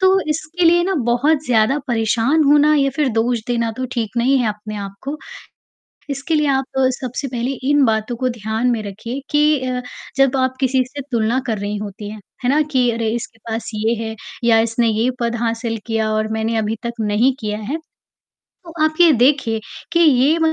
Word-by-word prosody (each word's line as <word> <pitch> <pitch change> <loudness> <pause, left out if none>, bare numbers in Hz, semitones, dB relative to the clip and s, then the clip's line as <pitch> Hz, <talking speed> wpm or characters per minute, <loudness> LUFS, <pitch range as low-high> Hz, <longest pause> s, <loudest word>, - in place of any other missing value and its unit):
तो 380 +1 +4
इसके 320 +3 -1
लिए 345 +1 +5
ना 385 +1 0
बहुत 280 +6 +2
ज़्यादा 240 +3 +3
परेशान 235 +6 +2
होना 295 +1 +5
या 275 -2 +2
फिर 300 -3 +2
दोष 230 +1 +1
देना 235 -2 0
तो 255 - -3
ठीक 235 -2 -3
नहीं 260 +4 +3
है 240 - +1
अपने 210 0 -6
आप 200 -1 -6
को। 285 +3 -4 0.9
इसके 280 +3 -2
लिए 300 -1 +2
आप 270 -1 +2 0.4
सबसे 255 +2 -4
पहले 245 +1 -2 0.2
इन 290 -2 +5
बातों 220 +1 0
को 255 +1 0
ध्यान 225 +1 -1
में 230 -3 -1
रखिए 230 +6 -6
कि 300 -1 +3
अ, 250 0 -1 0.4
जब 270 0 +3
आप 260 0 0
किसी 260 -1 +2
से 285 +2 -7
तुलना 230 +1 +1
कर 220 -3 -1
रही 205 +1 -3
होती 205 0 -6
हैं, 215 0 -9 0.2
है 245 - +3
ना, 300 - +3
कि 260 -5 +1
अरे 230 -1 -1
इसके 230 -1 -6
पास 225 0 -3
ये 220 +2 +1
है 220 0 -4 0.3
या 230 -1 +5
इसने 230 +1 +1
ये 225 +3 +1
पद 235 0 0
हासिल 230 0 -2
किया 225 -1 0
और 215 0 0
मैंने 220 +1 -1
अभी 220 +1 -1
तक 235 0 -5
नहीं 220 +5 +2
किया 210 -1 -3
है। 220 +8 -3 0.7
तो 340 -3 -16
आप 310 0 +1
ये 340 -2 +8
देखिए, 245 -3 +2 0.3
कि 340 - +3
ये 295 0 +4
240 Hz, 200 wpm, -19 LUFS, 225-275 Hz, 0.9 s, ये